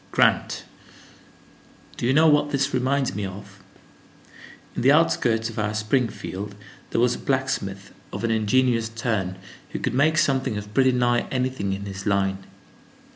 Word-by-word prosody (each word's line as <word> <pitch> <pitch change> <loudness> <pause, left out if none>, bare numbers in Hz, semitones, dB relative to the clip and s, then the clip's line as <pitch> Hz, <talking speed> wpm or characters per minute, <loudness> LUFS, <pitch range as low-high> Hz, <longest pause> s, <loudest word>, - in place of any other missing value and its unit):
"Grant, - - +2 1.3
do 120 - -2
you - - +3
know 155 +3 +5
what 150 -1 +4
this 140 -1 0
reminds 130 +1 +1
me 105 - -3
of? 100 0 -8 1.2
In - - -2
the 130 +3 +5
outskirts 120 -8 +3
of 115 -1 -6
our 105 0 -1
Springfield, 105 -3 -2 0.3
there - - 0
was 125 +1 +3
a - - -6
blacksmith 130 -8 -2 0.2
of - - -5
an 115 - +1
ingenious 115 +1 +2
turn, 110 -5 -2 0.4
who - - -2
could - - -2
make 155 +5 +3
something 135 -7 +1
of 105 0 -7
pretty 130 +2 +4
nigh 120 -1 +1
anything 130 -6 -1
in 100 +1 -5
his 100 +1 -6
line. 95 -1 +1
115 Hz, 155 wpm, -24 LUFS, 100-130 Hz, 1.3 s, know